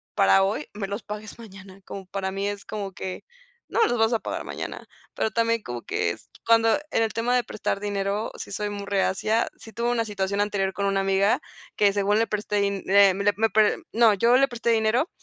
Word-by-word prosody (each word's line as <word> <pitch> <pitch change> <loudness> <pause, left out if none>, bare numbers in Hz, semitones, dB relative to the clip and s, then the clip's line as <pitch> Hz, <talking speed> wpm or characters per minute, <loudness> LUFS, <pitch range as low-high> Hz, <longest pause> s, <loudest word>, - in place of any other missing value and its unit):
para 95 0 +5
hoy, 125 +9 -1
me 205 -1 -4
los 200 +3 -5
pagues 210 0 -8
mañana. 195 -3 -12
Como 195 -1 -8
para 190 0 -3
mí 195 +1 -2
es 205 0 -4
como 205 -2 -5
que: 185 0 -6 0.4
"No - - 0
me - - +4
los 245 - 0
vas 225 +1 +3
a 230 - +2
pagar - - -4
mañana". - - -6 0.3
Pero 220 - -1
también 230 0 +1
como 120 -1 -6
que - - -1
es - - -11 0.2
cuando 225 -1 +5 0.2
en 225 - +2
el 220 - -2
tema 240 +2 +1
de 250 - +2
prestar 210 -2 -3
dinero, 205 +1 -2
sí - - -8
soy 210 +1 -2
muy 200 -1 -6
reacia, 200 +3 +1
sí 225 - -13
tuve 235 +1 -1
una 230 -2 0
situación 200 -1 -1
anterior 195 -2 0
con 200 - -2
una 195 0 +1
amiga 195 +1 +2 0.4
que 205 -1 +3
según 205 +1 +2
le 225 - +3
presté 210 0 -3
din 200 -1 -1
eh, 200 0 +6
me 195 +2 -3
le 205 0 +3
p 220 0 +3
le 210 - +1
no, 225 -1 +5
yo 235 +5 +4
le 275 +1 +4
presté 235 -2 -1
dinero 225 +7 +2
205 Hz, 230 wpm, -25 LUFS, 195-225 Hz, 0.4 s, eh